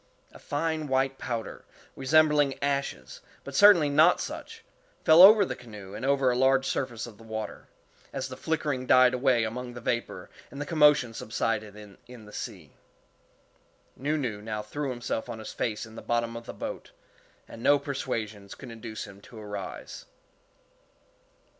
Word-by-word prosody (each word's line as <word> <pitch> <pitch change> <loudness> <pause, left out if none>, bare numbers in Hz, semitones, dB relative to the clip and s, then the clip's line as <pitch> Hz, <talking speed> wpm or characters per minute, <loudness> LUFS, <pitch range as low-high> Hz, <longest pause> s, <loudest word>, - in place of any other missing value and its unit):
A - - -14
fine 155 +1 -2
white 135 0 0
powder, 115 -3 -5 0.3
resembling 150 0 +3
ashes—but 140 - -4
certainly 195 -2 +7
not 155 +5 +5
such—fell - - 0
over 205 +1 +9
the - - -4
canoe 105 -5 -11
and 110 +4 -7
over 135 -1 +2
a - - 0
large 135 +1 +3
surface 120 -4 -2
of 115 -3 -13
the - - -14
water, 110 -1 -6 0.4
as 135 -1 -4
the 130 - -8
flickering 145 -4 -2
died 130 0 +6
away 125 -2 +2
among 120 +2 -5
the - - -6
vapor 120 0 -3 0.2
and 140 - -10
the 145 - -3
commotion 150 -7 +4
subsided 110 -2 -2 0.3
in 120 -3 -12
the 105 - -14
sea. 90 -11 -7 1.2
Nu 150 +4 -1
Nu 115 -8 -3
now 105 0 -4
threw 140 +6 -4
himself 120 -2 -4
on - - -5
his 110 - -8
face 110 -1 -2
in 110 - -14
the - - -9
bottom 120 -1 -1
of 115 0 -8
the - - -6
boat, - - -6 0.6
and 115 - -11
no 145 +4 +5
persuasions 110 -8 -5
could 120 - -10
induce 115 -2 -7
him 100 -1 -13
to 115 - -14
arise. 105 -2 -7
125 Hz, 160 wpm, -28 LUFS, 110-140 Hz, 1.2 s, over